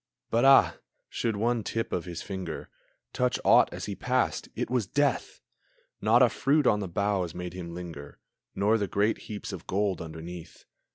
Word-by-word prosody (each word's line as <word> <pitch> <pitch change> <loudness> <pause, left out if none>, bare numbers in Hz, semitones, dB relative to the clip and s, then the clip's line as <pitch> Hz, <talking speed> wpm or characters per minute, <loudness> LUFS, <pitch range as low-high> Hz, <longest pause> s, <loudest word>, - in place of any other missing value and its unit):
But, 115 +3 +3
ah, 135 0 +6 0.3
should 115 -2 -1
one 115 +2 0
tip 115 +2 -3
of 90 - -1
his 85 -2 -6
finger 95 -5 -6 0.4
Touch 125 0 +1
aught - - +6
as - - -5
he - - -4
passed, - - -1
it - - -2
was 120 -6 +1
death! 145 +4 0 0.6
Not 115 +4 +5
a 125 - +5
fruit 145 +4 +2
on 105 -4 +4
the 100 - -3
boughs 95 -1 -1
made 90 -1 -5
him 85 -2 -7
linger, 80 -5 -8 0.4
Nor 105 +3 +2
the 100 - -1
great 105 +4 +1
heaps 105 -1 -5
of 90 - -8
gold 95 -2 0
underneath. 80 +1 -9
100 Hz, 175 wpm, -28 LUFS, 90-115 Hz, 0.6 s, ah